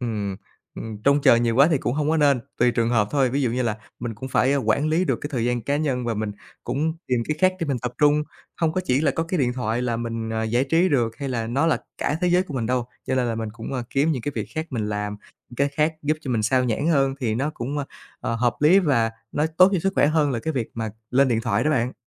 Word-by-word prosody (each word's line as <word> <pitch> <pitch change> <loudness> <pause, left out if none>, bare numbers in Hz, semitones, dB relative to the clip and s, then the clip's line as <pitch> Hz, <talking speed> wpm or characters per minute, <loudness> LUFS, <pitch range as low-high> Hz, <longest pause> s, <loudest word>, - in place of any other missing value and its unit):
ừm, 105 -5 -3 0.4
ừm, 110 -2 -7
trông 140 +1 +4
chờ 120 - +6
nhiều 115 -1 +1
quá 140 +4 +6
thì 155 - +3
cũng 125 - -2
hông 150 +1 0
có 160 - +2
nên, 140 -4 +3 0.2
tùy 120 +1 +4
trường 115 -1 0
hợp 105 -4 +2
thôi. 135 -3 +2
Ví 140 +3 0
dụ 125 - +1
như 125 +2 -1
là 115 -3 -1 0.2
mình 120 -1 -4
cũng 130 +5 -7
phải 135 +2 +2
quản 140 +2 +1
lý 165 +4 +2
được - - 0
cái 145 - -4
thời 120 -4 0
gian 120 0 0
cá 140 +5 0
nhân 135 -5 -1
và 115 -1 -1
mình 105 -1 -3 0.3
cũng 145 +6 -1
tìm 125 -2 +1
cái 155 - 0
khác 185 0 +4
để 165 - -1
mình 135 -3 -1
tập 125 +1 -4
trung, 150 0 +4 0.4
hông 160 -1 +2
có 185 - 0
chỉ 130 -4 +2
là 160 - +2
có 165 - -1
cái 170 +2 -2
điện 125 -2 +1
thoại 120 -1 -2
là 120 -2 -1
mình, 115 -1 -4
ờ, 110 0 -1
giải 120 +4 +1
trí 165 +6 +3
được 120 -7 +1
hay 140 -1 -4
là 115 -3 -2
nó 135 +7 +1
là 165 - +2 0.2
cả 145 - 0
thế 180 - +2
giới 180 +1 +4
của 170 -6 -9
mình 120 -4 -1
đâu, 125 0 0 0.2
cho - - 0
nên 130 -1 +1
là 115 - -1
mình 110 -1 -3
cũng, 115 +3 -7
ơ, 130 -2 -2
kiếm 145 +4 +2
những 125 - -3
cái 145 - -3
việc - - -3
khác 160 0 -2
mình 110 -5 -2
làm, 105 0 -3 0.3
những 120 - -13
cái 140 +2 +2
khác 150 +3 0
giúp 150 +1 +1
cho 140 - -5
mình 115 -3 +1
xao 125 +4 +2
nhãng 125 +6 0
hơn 135 -4 +2
thì 115 -4 0
nó 135 +6 -1
cũng, 135 +4 -4
ơ, 145 - -2 0.4
ờ, 115 - -2
hợp 120 +1 +1
lý 160 +6 +6
và 130 - +2 0.2
nó 150 - +1
tốt 185 +1 +8
cho 190 - +2
sức 195 +3 0
khỏe - - +4
hơn 150 -1 +2
là 125 - -1
cái 160 +8 -3
việc 125 -5 -2
mà 115 -1 -3 0.2
lên 135 +2 +4
điện 115 -2 +1
thoại - - 0
đó 155 - +2
bạn. 125 -3 +1
130 Hz, 295 wpm, -23 LUFS, 115-150 Hz, 0.4 s, tốt